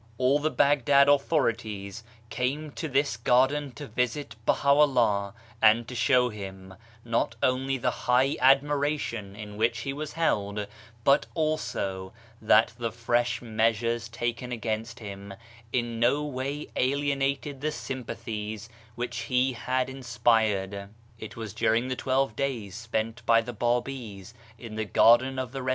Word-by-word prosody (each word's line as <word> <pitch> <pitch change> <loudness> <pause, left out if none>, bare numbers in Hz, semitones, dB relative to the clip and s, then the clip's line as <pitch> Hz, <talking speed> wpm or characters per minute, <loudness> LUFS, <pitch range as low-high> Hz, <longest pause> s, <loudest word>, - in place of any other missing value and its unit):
All 130 +4 +3
the 155 +1 0
Baghdad 140 -1 +4
authorities 115 -8 0 0.3
came 145 +4 -2
to 160 - -5
this 140 -2 0
garden 130 +4 +2
to 145 +2 -8
visit 125 +2 -2
Baha'u'llah, 125 -8 +3 0.3
and 110 +1 +5
to 125 - -7
show 125 +1 +3
him, 95 -3 -9 0.3
not 115 0 0
only 135 +1 +1
the 125 0 0 0.2
high 130 +3 +4
admiration 135 -6 +2
in 105 -1 -9
which 115 0 +1
he 135 +3 -3
was 150 +1 -6
held, 105 -10 0 0.4
but 140 +3 +4
also 100 - -2 0.3
that 110 +1 +4
the 115 -1 -2
fresh 120 0 0
measures 115 +1 0
taken 120 +1 -3
against 115 0 -3
him 100 -3 -8 0.4
in 120 -2 -1
no 130 +5 +2
way 140 +1 -4
alienated 140 +1 0
the 155 +1 0
sympathies 110 -5 -6 0.3
which 120 +1 -4
he 130 +1 +1
had 130 +2 -1
inspired. 115 -6 0 0.3
It 110 - -8
was 110 -4 -6
during 115 +2 +1
the 130 - -1
twelve 130 -2 0
days 120 -8 -3
spent 115 +2 -3
by 115 0 +6
the 120 +2 -7
Babis 120 -3 -3 0.2
in 115 -1 -9
the 110 - -1
Garden 120 +5 +4
of 130 -2 -3
the 135 0 -5
Ri? 130 - -2
120 Hz, 140 wpm, -27 LUFS, 110-135 Hz, 0.4 s, by